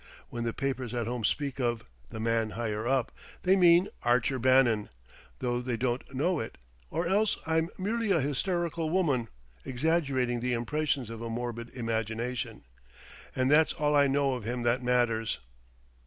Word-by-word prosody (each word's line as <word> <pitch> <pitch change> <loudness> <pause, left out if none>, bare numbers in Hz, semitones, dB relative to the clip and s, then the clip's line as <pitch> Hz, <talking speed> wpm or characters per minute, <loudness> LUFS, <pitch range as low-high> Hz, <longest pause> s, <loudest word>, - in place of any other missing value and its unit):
When 120 -1 -4
the 115 - 0
papers 130 -2 -3
at 120 -2 -1
home 120 0 -3
speak 140 +4 -1
of 120 -3 -1 0.2
'The 110 - -7
Man 115 0 +1
Higher 110 -1 -2
Up' 130 -1 +1 0.3
they 190 +1 +5
mean 175 0 +6
Archer 125 +2 +2
Bannon, 125 -4 +4 0.5
though 120 -1 -1
they 125 -1 -2
don't 125 +2 -2
know 160 +5 +1
it 110 - -6 0.3
or 170 - -1
else 200 +4 +2
I'm 160 +1 +1
merely 220 +3 -1
a 180 -4 +4
hysterical 165 +3 -1
woman 150 -10 +1 0.4
exaggerating 130 -3 0
the 125 +1 -1
impressions 135 0 -1
of 115 0 -7
a 115 - -4
morbid 115 0 -4
imagination.... 115 +1 -3 0.7
And 130 +1 +2
that's 155 +1 +5
all 150 0 +1
I 140 -1 +5
know 140 0 +2
of 125 -3 -4
him 120 +2 -3
that 120 +2 +2
matters." 120 -3 +1
125 Hz, 160 wpm, -29 LUFS, 120-150 Hz, 0.7 s, mean